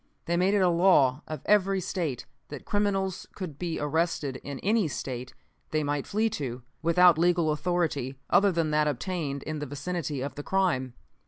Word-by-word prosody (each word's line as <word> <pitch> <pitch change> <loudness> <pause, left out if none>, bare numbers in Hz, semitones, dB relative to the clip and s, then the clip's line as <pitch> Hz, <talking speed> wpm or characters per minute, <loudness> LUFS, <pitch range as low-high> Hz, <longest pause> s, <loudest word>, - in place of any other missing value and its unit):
"They 170 - 0
made 185 +3 +3
it 200 - +3
a - - +5
law 170 -6 +4
of 155 -3 -5
every 195 -2 +3
State 165 - -3 0.2
that 145 -2 -9
criminals 195 -2 -1
could 165 -8 -6
be 170 -2 -3
arrested 150 -3 -1
in 140 -1 -7
any 210 -2 +2
State 130 -3 -5 0.3
they 155 -1 0
might 145 -1 -2
flee 215 +2 +1
to, 125 -6 -4 0.2
without 170 0 +5
legal 170 -2 +3
authority, 150 -5 -1
other 200 0 +4
than 165 -3 0
that 150 0 +2
obtained 145 -1 -3
in 155 -1 -4
the 150 - -4
vicinity 145 0 -3
of 140 +1 -4
the 145 - -6
crime. 145 -9 0
160 Hz, 175 wpm, -28 LUFS, 145-180 Hz, 0.3 s, a